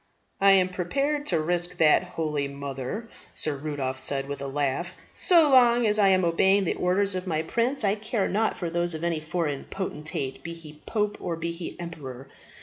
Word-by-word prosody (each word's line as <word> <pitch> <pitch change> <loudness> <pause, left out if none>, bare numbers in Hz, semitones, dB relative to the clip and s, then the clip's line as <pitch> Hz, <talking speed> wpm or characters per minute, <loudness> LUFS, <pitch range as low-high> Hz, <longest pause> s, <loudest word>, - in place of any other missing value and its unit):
"I 195 0 +6
am 185 -1 +4
prepared 275 - -1
to 170 - +2
risk 175 +2 -1
that, 155 -2 +5
holy 155 -5 -2
mother," 140 - -5 0.3
Sir 155 -2 -2
Rudolph 135 -2 -3
said, 135 +1 -2
with 140 0 -5
a 140 - -3
laugh. 145 +6 -1 0.2
"So 335 -4 +5
long 240 -2 +6
as 210 0 +2
I 200 - +6
am 185 -2 +4
obeying 190 +4 +3
the 180 - 0
orders 195 +2 +1
of 185 0 -4
my 160 -2 0
prince, 240 - 0
I 200 -1 +3
care 215 0 -1
nought 220 +3 0
for 170 -2 -3
those 175 0 0
of 160 - -6
any 170 -2 0
foreign 155 -2 -3
potentate, 150 -7 -4
be 170 0 -6
he 155 -2 -12
pope 210 -2 -1
or 170 -2 -2
be 165 +1 -3
he 170 +1 -7
emperor. 140 -7 -8
175 Hz, 195 wpm, -26 LUFS, 150-195 Hz, 0.3 s, I